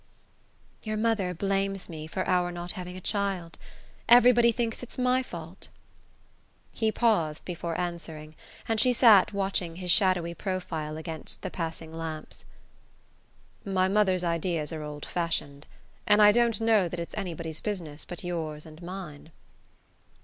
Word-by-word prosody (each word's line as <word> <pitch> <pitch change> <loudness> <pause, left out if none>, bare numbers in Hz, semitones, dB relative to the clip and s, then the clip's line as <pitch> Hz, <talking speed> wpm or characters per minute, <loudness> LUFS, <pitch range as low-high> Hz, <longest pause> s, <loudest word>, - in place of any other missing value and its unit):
"Your 215 -1 -2
mother 215 -4 +1
blames 195 +1 -1
me 155 -2 -7
for 185 +3 -3
our 180 -1 +2
not 175 0 -3
having 180 -2 -7
a - - -6
child. 190 -5 -2 0.5
Everybody 240 0 +7
thinks 230 -1 -2
it's 250 - -8
my 255 0 +3
fault." 170 -5 -9 1.1
He 220 -1 +1
paused 170 -11 +1
before 170 -2 -4
answering, 165 -3 -5 0.3
and 225 -1 +1
she 250 +3 +4
sat 220 -6 +7
watching 190 -4 -1
his 180 0 -2
shadowy 180 -3 +3
profile 165 -5 -4
against 160 0 -7
the - - -4
passing 165 -2 -5
lamps. 160 -1 -6 1.2
"My 190 -3 +1
mother's 190 -2 +2
ideas 170 -2 -1
are 155 - -4
old 150 -1 -6
fashioned; 155 -4 -3 0.4
and 210 0 +6
I 210 0 +8
don't 235 0 +2
know 220 -5 +3
that 175 - -5
it's 170 - -6
anybody's 165 -5 -5
business 170 -8 -4
but 175 - -8
yours 160 -4 -4
and 155 +1 -13
mine." 170 -4 -8
180 Hz, 140 wpm, -28 LUFS, 165-205 Hz, 1.2 s, I